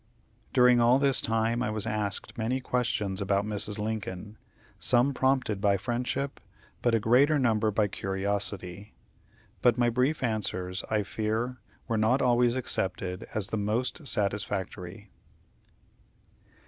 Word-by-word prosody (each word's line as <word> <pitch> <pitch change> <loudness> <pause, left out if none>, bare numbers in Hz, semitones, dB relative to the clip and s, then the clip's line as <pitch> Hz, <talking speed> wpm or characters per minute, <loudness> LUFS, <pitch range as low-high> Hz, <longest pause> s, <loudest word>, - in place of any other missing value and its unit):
During 125 -1 +5
all 120 +2 +5
this 140 -2 +3
time 115 +1 0
I 125 - 0
was 110 -1 -2
asked 105 0 -3
many 120 +2 -1
questions 110 -6 -1
about 100 +1 +1
Mrs. 105 0 -1
Lincoln, 105 -1 -5 0.4
some 125 +3 +3
prompted 130 -6 +1
by 100 -1 +3
friendship, 120 +6 -3 0.4
but 120 -1 +2
a - - +2
greater 130 +8 +4
number 110 -5 +2
by 105 0 +1
curiosity; 100 0 -3 0.7
but 120 +2 +4
my 120 -1 +2
brief 130 +5 0
answers, 95 -5 -2
I 110 -1 +1
fear, 110 +5 -2 0.3
were 115 -3 0
not 110 +5 +3
always 120 -1 +3
accepted 95 -7 -2
as 105 -3 -1
the 110 - -2
most 120 +8 -2
satisfactory. 100 -2 -2
110 Hz, 130 wpm, -28 LUFS, 100-125 Hz, 0.7 s, During